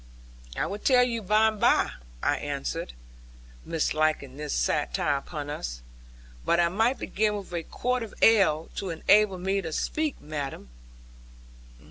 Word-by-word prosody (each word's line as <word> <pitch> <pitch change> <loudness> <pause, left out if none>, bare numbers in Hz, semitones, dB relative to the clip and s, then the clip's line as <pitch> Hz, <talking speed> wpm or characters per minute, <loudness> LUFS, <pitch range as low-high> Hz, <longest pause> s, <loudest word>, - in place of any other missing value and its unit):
'I - - +1
will 205 - -4
tell 250 +2 +5
you 235 -2 -1
by 215 +2 +4
and 215 -1 -7
by,' - - +4 0.3
I - - +2
answered, 60 -1 -4 0.7
misliking 155 -4 0
this 150 0 -5
satire 150 0 0
upon 145 +1 -6
us; - - -5 0.6
'but 170 - +2
I 170 0 +4
might 225 +8 +1
begin 210 0 0
with 195 -3 -9
a 170 - -1
quart 250 +9 -2
of 225 -3 -7
ale, 190 -8 +4
to 195 - -3
enable 195 +4 +3
me 190 +2 0
to 160 - -5
speak, 310 - -2
madam.' 145 - -6
180 Hz, 145 wpm, -27 LUFS, 150-215 Hz, 0.7 s, tell